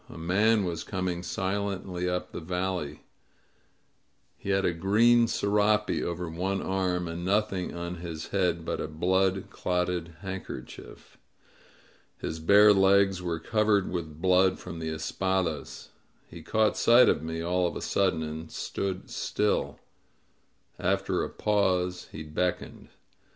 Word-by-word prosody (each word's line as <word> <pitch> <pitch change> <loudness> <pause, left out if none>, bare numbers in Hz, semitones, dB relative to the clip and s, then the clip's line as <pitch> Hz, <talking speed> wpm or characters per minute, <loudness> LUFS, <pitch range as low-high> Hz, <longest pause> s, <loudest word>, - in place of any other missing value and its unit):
A - - -10
man 100 +6 +2
was 85 -2 -3
coining 90 -3 -3
silently 95 0 -2
up 90 0 -3
the - - -5
valley. 90 -2 -3 1.3
He - - -8
had 95 0 +2
a 85 - +2
green 115 +7 +4
serape 105 0 +1
over 85 0 -3
one 95 +4 -2
arm, 90 -2 -1
and 85 +1 -5
nothing 100 -2 0
on 85 +1 -5
his 80 -2 -6
head 90 -4 0
but - - -2
a - - -3
blood 95 +4 0
clotted 90 -1 -1
hand 95 -1 -5
kerchief. - - -10 1.0
His 80 - -5
bare 100 +5 +7
legs 95 -1 +4
were 85 -2 -2
covered 105 +1 +1
with 80 -4 -5
blood 95 +1 +3
from 85 -2 -8
the 80 -1 -3
espadas. 80 0 -2 0.4
He 85 - -11
caught 110 +6 +1
sight 120 +1 +6
of - - +2
me 80 +1 -4
all 90 +1 +1
of - - -5
a - - -3
sudden, 95 -5 +1
and 80 +1 -6
stood 95 -1 -4
still; - - -1 1.0
after 95 0 0
a - - -3
pause 90 -4 0
he 80 - -7
beckoned. 90 +4 -3
90 Hz, 140 wpm, -28 LUFS, 85-100 Hz, 1.3 s, bare